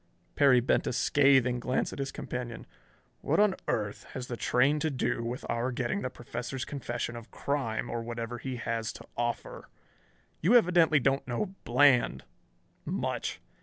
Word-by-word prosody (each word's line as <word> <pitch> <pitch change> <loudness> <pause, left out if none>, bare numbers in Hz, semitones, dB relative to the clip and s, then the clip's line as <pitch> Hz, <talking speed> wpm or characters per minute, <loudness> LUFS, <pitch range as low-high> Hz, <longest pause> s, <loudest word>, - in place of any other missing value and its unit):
Perry 135 -4 +5
bent 120 - +1
a - - -1
scathing 130 -1 +4
glance 125 +2 -1
at - - -8
his 135 0 -2
companion. 120 -3 -5 0.5
"What - - +1
on 210 -2 +5
earth 105 -1 -2
has 130 - -4
the 125 - -5
train 135 +6 +2
to 160 - 0
do 130 -4 -1
with 120 +2 -4
our 120 +2 -1
getting 190 +10 -1
the - - -2
Professor's 125 +1 -5
confession 120 -4 -4
of 115 -1 -9
crime 135 -6 -2
or 120 - -3
whatever 115 +1 -5
he 130 0 -4
has 115 -2 -2
to - - -11
offer? 120 -1 -3 0.7
You 195 +10 +4
evidently 170 -8 +5
don't 135 +1 +1
know 185 - -2
Bland 125 0 +4 0.6
much. - - -3
125 Hz, 160 wpm, -29 LUFS, 120-140 Hz, 0.7 s, Perry